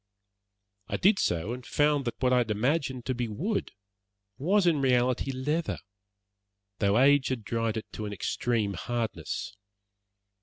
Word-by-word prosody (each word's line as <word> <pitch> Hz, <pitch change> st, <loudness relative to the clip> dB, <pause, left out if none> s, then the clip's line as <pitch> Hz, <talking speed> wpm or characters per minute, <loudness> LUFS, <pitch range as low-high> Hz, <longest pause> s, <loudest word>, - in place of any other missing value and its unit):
I -, -, -2 dB
did 195 Hz, +1 st, +4 dB
so, 85 Hz, +7 st, 0 dB
and 125 Hz, 0 st, -7 dB
found 145 Hz, +1 st, +1 dB
that 120 Hz, -, -4 dB
what 125 Hz, 0 st, +4 dB
I 125 Hz, -, +5 dB
had 120 Hz, -2 st, 0 dB
imagined 130 Hz, +3 st, 0 dB
to 130 Hz, -, 0 dB
be 120 Hz, -1 st, -2 dB
wood 175 Hz, -, -2 dB, 0.7 s
was 190 Hz, +7 st, +3 dB
in 160 Hz, -5 st, +3 dB
reality 125 Hz, 0 st, +2 dB
leather, 150 Hz, +6 st, -1 dB, 1.0 s
though 100 Hz, +1 st, +3 dB
age 140 Hz, +1 st, +5 dB
had 125 Hz, -4 st, -2 dB
dried 115 Hz, +1 st, -1 dB
it 110 Hz, -, -4 dB
into 110 Hz, -, -4 dB
an -, -, -5 dB
extreme 110 Hz, +1 st, -1 dB
hardness. 115 Hz, 0 st, -3 dB
125 Hz, 150 wpm, -28 LUFS, 115-145 Hz, 1.0 s, I